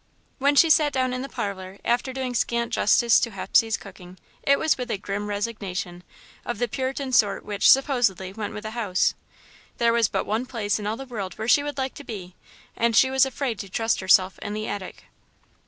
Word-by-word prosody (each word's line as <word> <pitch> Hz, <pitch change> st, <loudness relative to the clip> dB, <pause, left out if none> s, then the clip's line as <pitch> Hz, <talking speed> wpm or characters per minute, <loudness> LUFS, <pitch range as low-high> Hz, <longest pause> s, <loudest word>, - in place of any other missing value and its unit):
When 285 Hz, +2 st, +3 dB
she 325 Hz, +2 st, +6 dB
sat 305 Hz, -2 st, +4 dB
down 255 Hz, -1 st, 0 dB
in 255 Hz, -, -3 dB
the 275 Hz, -, -6 dB
parlour, 190 Hz, -3 st, -5 dB
after 245 Hz, +2 st, 0 dB
doing 260 Hz, -1 st, -4 dB
scant 235 Hz, 0 st, -1 dB
justice 235 Hz, +2 st, +4 dB
to 235 Hz, -, -1 dB
Hepsey's 220 Hz, +2 st, +1 dB
cooking, 185 Hz, -2 st, -13 dB, 0.2 s
it 280 Hz, 0 st, +3 dB
was 315 Hz, -, +2 dB
with 250 Hz, -1 st, -6 dB
a 210 Hz, -, -1 dB
grim 200 Hz, +1 st, -4 dB
resignation, 200 Hz, -4 st, -4 dB, 0.4 s
of 240 Hz, -, -4 dB
the 245 Hz, -, 0 dB
Puritan 265 Hz, +2 st, -3 dB
sort 210 Hz, -5 st, +2 dB
which, 205 Hz, -1 st, +2 dB
supposedly, 240 Hz, -9 st, +3 dB
went 210 Hz, 0 st, -5 dB
with 210 Hz, -, -7 dB
the 215 Hz, -, -5 dB
house. 210 Hz, -6 st, 0 dB, 0.6 s
There 235 Hz, -1 st, +3 dB
was 230 Hz, -2 st, +3 dB
but -, -, -2 dB
one 225 Hz, +5 st, -2 dB
place 215 Hz, -4 st, -1 dB
in 205 Hz, -, -4 dB
all 220 Hz, +2 st, -2 dB
the 270 Hz, -, -7 dB
world 205 Hz, -8 st, -6 dB
where 220 Hz, -, -4 dB
she 285 Hz, -, +5 dB
would 290 Hz, -1 st, -5 dB
like 265 Hz, -1 st, -2 dB
to 290 Hz, -, -10 dB
be, 190 Hz, -8 st, -8 dB, 0.4 s
and 230 Hz, -1 st, +1 dB
she 260 Hz, +2 st, +5 dB
was 265 Hz, 0 st, +4 dB
afraid 260 Hz, -5 st, -3 dB
to 200 Hz, -, -7 dB
trust 225 Hz, +3 st, 0 dB
herself 190 Hz, 0 st, +3 dB
in 205 Hz, -, -5 dB
the 215 Hz, 0 st, -4 dB
attic. 195 Hz, -3 st, -6 dB
230 Hz, 210 wpm, -24 LUFS, 200-260 Hz, 0.6 s, she